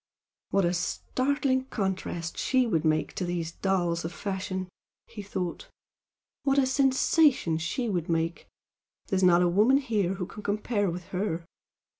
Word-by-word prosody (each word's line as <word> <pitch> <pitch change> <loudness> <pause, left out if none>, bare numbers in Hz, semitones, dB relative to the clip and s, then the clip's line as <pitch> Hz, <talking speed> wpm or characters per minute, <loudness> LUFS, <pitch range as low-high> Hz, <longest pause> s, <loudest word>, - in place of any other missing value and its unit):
"What 195 -2 +2
a 175 - +1
startling 260 +8 0
contrast 190 -7 -3
she 260 -1 +2
would 170 -9 +1
be 155 0 +2
to - - -6
these 175 -2 -2
dolls 175 -3 0
of 165 - -4
fashion!" 190 0 -4 0.4
he 210 - -9
thought 185 -3 -4 0.7
"What 275 -1 +1
a 275 - +5
sensation 265 - +3
she 235 +9 -2
would 175 -6 -2
make! 165 0 -1 0.6
There's 190 -1 +1
not 180 -1 +5
a - - +4
woman 210 +10 +4
here 210 -9 0
who 180 - -3
can 210 - -10
compare 205 0 0
with 175 +1 -6
her! 180 -3 -2
190 Hz, 150 wpm, -28 LUFS, 175-245 Hz, 0.7 s, a